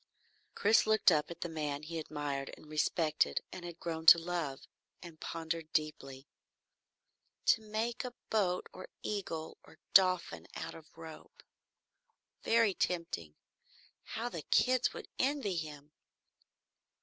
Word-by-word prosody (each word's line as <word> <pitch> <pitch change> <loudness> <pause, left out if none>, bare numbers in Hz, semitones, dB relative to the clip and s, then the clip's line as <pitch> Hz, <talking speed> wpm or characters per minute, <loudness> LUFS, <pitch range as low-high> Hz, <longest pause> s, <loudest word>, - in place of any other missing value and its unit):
Chris 215 +1 +4
looked 215 -3 +5
up 150 -2 +2
at 170 0 -9
the - - -1
man 150 -3 -3
he 165 +1 -4
admired 145 -3 -3
and - - -15
respected 155 - +2
and 185 - -8
had 170 -1 -8
grown 160 -1 -4
to 170 - +11
love, 165 -5 -3 0.4
and 165 -3 -11
pondered 165 -1 -4
deeply. 135 -3 -2 1.2
To 225 - +5
make 220 +3 -2
a 250 -1 -6 0.2
boat 185 -5 +1
or 185 - -9 0.2
eagle 165 -6 -4
or - - -17 0.2
dolphin 185 -2 +4
out - - -5
of 160 0 -14
rope? 160 -1 -11 1.0
Very 225 -3 +4
tempting! 165 - -2 0.8
How 230 +2 -1
the 170 -9 -5
kids 255 - +3
would - - -8
envy 265 -8 +1
him! 150 -2 -6
165 Hz, 130 wpm, -33 LUFS, 155-200 Hz, 1.2 s, to